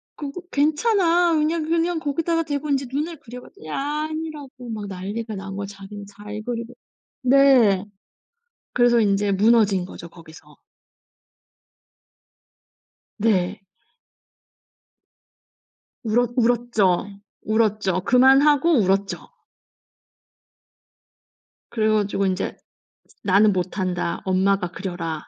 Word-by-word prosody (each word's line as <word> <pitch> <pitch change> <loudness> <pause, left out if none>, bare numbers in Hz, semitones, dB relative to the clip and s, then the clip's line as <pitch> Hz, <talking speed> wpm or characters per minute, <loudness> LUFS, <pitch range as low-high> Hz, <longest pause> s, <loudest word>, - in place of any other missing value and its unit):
"그거 290 +4 -7
괜찮아. 340 +3 +2
그냥 315 +1 +1
그냥 335 0 0
거기다가 330 +3 -1
대고 295 -1 -4
이제 275 -1 0
눈을 315 +2 -3
그려봐." 245 0 -11
그랬더니 155 - -15
아니라고 300 -3 -5
막 215 -2 -5
난리가 205 +4 -5
난 195 0 -7
거예요. 200 0 -4
자기는 200 +1 -10
잘 210 +1 -9
그리고 240 0 -5 0.5
네. 255 -7 +5 0.9
그래서 240 -1 +4
인제 200 -1 +1
무너진거죠. 195 -4 +1
거기서. 160 -2 -16 2.6
네. 195 -5 +1 2.4
울었 240 +1 +1
울었죠. 230 -6 +1 0.4
울었죠. 215 -4 +1
그만하고 275 - +4
울었죠. 195 0 -1 2.4
그래가지고 215 -3 0
이제 185 +1 -2 0.7
"나는 200 +2 +4
못한다. 180 -1 -2
엄마가 190 -1 +1
그려라." 175 -3 -5
225 Hz, 220 characters per minute, -22 LUFS, 195-285 Hz, 2.6 s, 네